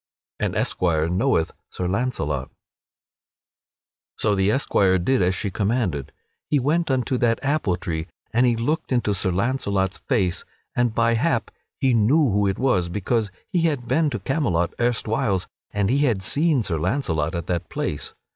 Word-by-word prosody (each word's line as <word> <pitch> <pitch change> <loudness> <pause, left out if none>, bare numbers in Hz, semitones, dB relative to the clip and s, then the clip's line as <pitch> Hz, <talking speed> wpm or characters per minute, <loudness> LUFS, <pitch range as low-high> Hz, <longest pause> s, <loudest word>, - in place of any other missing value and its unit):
[Sidenote: - - -1
An - - +1
esquire 80 -3 +1
knoweth 90 -2 +1 0.2
Sir 90 - -3
Launcelot] 85 - -1 1.7
So 105 - +2
the 95 0 +2
esquire 100 -6 +3
did 125 +8 +1
as 90 +1 +2
she 100 - -3
commanded; 100 - -1 0.4
he 150 - +3
went 155 +5 +1
unto 130 -1 0
that 115 -1 +2
apple 140 - +1
tree 85 -2 -4 0.3
and 120 +2 +4
he 120 - +3
looked 135 +9 -1
into 120 -5 +1
Sir 95 0 0
Launcelot's 100 -2 0
face, 100 -10 0 0.3
and 120 -2 +1
by 115 0 +3
hap 115 - 0 0.3
he 130 -2 +2
knew 125 +5 +4
who 100 +1 +2
it 95 - -1
was 110 -10 +1
because 105 +3 0 0.2
he 180 -3 +2
had 145 -7 0
been 155 +2 +2
to - - -3
Camelot 90 - 0
erstwhiles 110 -5 0 0.2
and 100 -1 0
he 140 - +2
had 120 -10 +1
seen 145 - +2
Sir 85 -6 -1
Launcelot 85 - 0
at 85 -1 -3
that 85 -1 -2
place. 75 - -4
105 Hz, 165 wpm, -23 LUFS, 90-130 Hz, 1.7 s, and